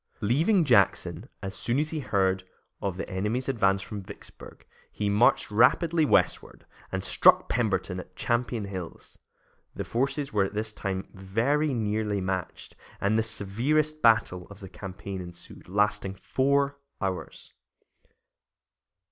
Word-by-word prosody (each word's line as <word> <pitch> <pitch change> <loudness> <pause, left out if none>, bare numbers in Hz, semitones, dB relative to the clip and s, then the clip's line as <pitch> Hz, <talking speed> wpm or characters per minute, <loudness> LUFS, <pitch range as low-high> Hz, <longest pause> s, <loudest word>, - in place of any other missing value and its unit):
Leaving 165 - +3
Jackson 125 -4 +2
as 95 -1 -4
soon 120 +5 -1
as 150 +1 0
he 160 - -2
heard 95 -7 +1 0.4
of 95 -3 -2
the - - -4
enemy's 105 +7 -2
advance 100 -7 +2
from 105 0 -6
Vicksburg, 100 +1 -12 0.3
he 105 -1 -1
marched 105 +1 +3
rapidly 155 +9 +4
westward - - +1 0.3
and 95 0 -2
struck - - +5
Pemberton 100 -5 0
at 90 0 -11
Champion 120 0 -1
Hills. 95 -4 -8 0.6
The - - -3
forces 135 +3 -1
were 105 -2 +3
at 95 - -7
this 110 0 -2
time 95 -2 -4
very 115 +11 0
nearly 105 -2 -1
matched, 95 -1 -4 0.2
and 100 +2 +1
the 110 - +3
severest 125 +9 0
battle 110 -6 +3
of 100 -1 -12
the 95 -3 -9
campaign 95 +1 -7
ensued, 85 0 -11
lasting 100 0 0
four 140 +6 +1 0.2
hours. 95 -2 -5
105 Hz, 135 wpm, -27 LUFS, 95-125 Hz, 0.6 s, struck